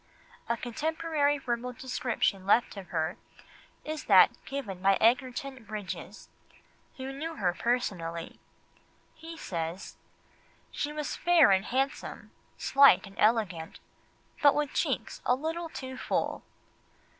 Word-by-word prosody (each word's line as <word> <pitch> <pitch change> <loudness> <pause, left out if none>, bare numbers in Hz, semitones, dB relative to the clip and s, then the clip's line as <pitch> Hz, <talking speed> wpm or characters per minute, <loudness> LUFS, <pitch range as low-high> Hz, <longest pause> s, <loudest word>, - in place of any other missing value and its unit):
A 235 - +1
contemporary 295 +3 0
verbal 250 -2 -3
description 240 -6 -1
left 235 +3 +3
of 195 -2 -8
her 165 +4 -2 0.7
is 310 0 -5
that - - +7
given 215 -10 -5
by 195 +1 +5
Sir - - +1
Egerton 255 +2 +1
Brydges, 210 -2 -7 0.7
who 265 0 -5
knew 320 +4 -5
her 180 -5 0
personally. 175 -9 -2 0.7
He 325 +1 -10
says: 170 - -5 0.7
"She 290 - -3
was 300 -1 -4
fair 345 - +5
and 190 +1 +3
handsome, 270 +2 -2 0.3
slight 275 -5 +6
and 195 - -12
elegant, 210 -7 +1 0.6
but 285 -1 +6
with 295 -2 -1
cheeks - - -1
a 250 - +3
little 325 +4 -4
too 260 -4 -7
full." - - -1
250 Hz, 120 wpm, -29 LUFS, 195-285 Hz, 0.7 s, that